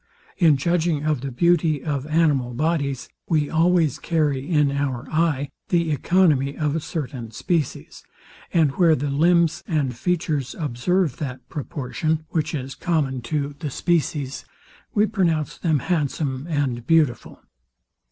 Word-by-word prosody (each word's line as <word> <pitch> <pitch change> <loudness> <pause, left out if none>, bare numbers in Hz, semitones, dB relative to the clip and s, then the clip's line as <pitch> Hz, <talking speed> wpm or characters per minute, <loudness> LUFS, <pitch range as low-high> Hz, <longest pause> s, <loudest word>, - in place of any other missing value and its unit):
In 160 -6 +5
judging 165 0 0
of 150 -5 0
the 135 0 -4
beauty 155 +1 +2
of 145 -2 -2
animal 145 -6 +1
bodies, 140 -2 -1 0.2
we 150 -3 +1
always 165 -3 +2
carry 150 -4 0
in 150 -4 +3
our 140 -3 -2
eye 155 -4 +1 0.2
the 170 -3 +2
economy 145 -3 +2
of 150 -2 0
a - - +1
certain 145 -7 -5
species; 165 - -3 0.5
and 160 -5 +3
where 170 -3 +5
the 145 0 -2
limbs 165 +2 +3
and 140 -6 0
features 155 -3 -1
observe 150 +3 0
that 130 -4 -6
proportion, 155 +2 -3
which 160 -2 -1
is 135 -1 -5
common 145 -7 -1
to 145 -2 0
the 155 - -3
species, 145 -3 -1 0.5
we 210 0 +4
pronounce 170 -9 0
them 160 -4 +2
handsome 145 -2 -1
and 130 -6 -1
beautiful. 155 -8 +1
150 Hz, 135 wpm, -23 LUFS, 140-165 Hz, 0.5 s, In